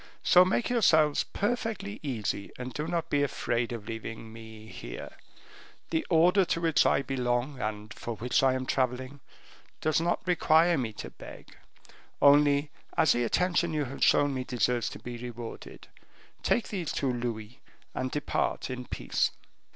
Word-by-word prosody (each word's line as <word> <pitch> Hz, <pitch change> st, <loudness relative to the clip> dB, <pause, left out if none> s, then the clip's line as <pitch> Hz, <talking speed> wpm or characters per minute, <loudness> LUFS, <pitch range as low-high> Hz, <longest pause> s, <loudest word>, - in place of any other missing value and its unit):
So 180 Hz, -, +7 dB
make 205 Hz, +6 st, 0 dB
yourselves 155 Hz, -10 st, +4 dB
perfectly 215 Hz, -2 st, -2 dB
easy, 110 Hz, -8 st, -3 dB
and 125 Hz, 0 st, -6 dB
do 150 Hz, +1 st, -3 dB
not 165 Hz, -1 st, -2 dB
be 145 Hz, -, +3 dB
afraid 120 Hz, -4 st, -1 dB
of 115 Hz, -3 st, -6 dB
leaving 115 Hz, 0 st, -7 dB
me 110 Hz, -1 st, -11 dB
here. 75 Hz, -, -8 dB, 0.8 s
The 160 Hz, -, +1 dB
order 180 Hz, +4 st, +5 dB
to 170 Hz, -, -1 dB
which 165 Hz, -1 st, +3 dB
I 140 Hz, -, +2 dB
belong, 125 Hz, 0 st, -1 dB
and 105 Hz, -1 st, -4 dB
for 120 Hz, -, -5 dB
which 120 Hz, +3 st, +1 dB
I 130 Hz, -1 st, +3 dB
am 130 Hz, 0 st, -3 dB
traveling, 130 Hz, +2 st, -1 dB, 0.6 s
does 155 Hz, +1 st, +1 dB
not 175 Hz, +1 st, -1 dB
require 170 Hz, -1 st, +4 dB
me 125 Hz, -6 st, -2 dB
to -, -, -8 dB
beg; -, -, -12 dB, 0.6 s
only, 145 Hz, 0 st, +5 dB, 0.3 s
as 160 Hz, -3 st, +5 dB
the 120 Hz, -, +2 dB
attention 175 Hz, +5 st, +1 dB
you 150 Hz, -2 st, 0 dB
have 135 Hz, +2 st, -4 dB
shown 145 Hz, -1 st, +4 dB
me 130 Hz, -1 st, -2 dB
deserves 125 Hz, -2 st, 0 dB
to -, -, -8 dB
be 120 Hz, -1 st, -7 dB
rewarded, 120 Hz, -1 st, -8 dB, 0.5 s
take 235 Hz, -, +1 dB
these 180 Hz, -7 st, -3 dB
two 135 Hz, -3 st, -1 dB
louis 120 Hz, -1 st, -5 dB, 0.3 s
and 130 Hz, 0 st, -2 dB
depart 145 Hz, -1 st, -2 dB
in 125 Hz, 0 st, -5 dB
peace." -, -, 0 dB
135 Hz, 160 wpm, -29 LUFS, 120-160 Hz, 0.8 s, So